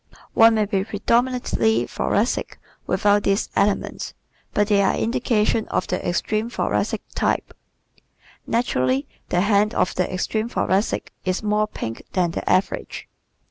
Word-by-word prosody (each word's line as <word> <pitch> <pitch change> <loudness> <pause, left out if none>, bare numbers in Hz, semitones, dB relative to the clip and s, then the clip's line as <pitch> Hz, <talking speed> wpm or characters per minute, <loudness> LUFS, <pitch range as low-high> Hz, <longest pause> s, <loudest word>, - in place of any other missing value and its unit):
One 225 0 +6
may 215 -1 +2
be 195 -2 0
predominantly 230 +2 +1
Thoracic - - -1 0.3
without 205 0 +3
these 200 0 0
elements 205 0 0 0.4
but 205 0 +1
they 205 -2 +4
are 195 - +2
indications 225 -2 +1
of - - -1
the 180 - -3
extreme 215 +5 -1
Thoracic - - -1
type. - - -1 0.9
Naturally 135 - +1 0.2
the 175 - +2
hand 205 +2 +2
of - - +1
the 180 - -1
extreme 215 +5 -1
Thoracic 200 -3 0
is 185 +3 -1
more 210 0 +1
pink 115 - -6
than 180 -3 +1
the - - -4
average. 185 +1 0
205 Hz, 135 wpm, -22 LUFS, 185-220 Hz, 0.9 s, One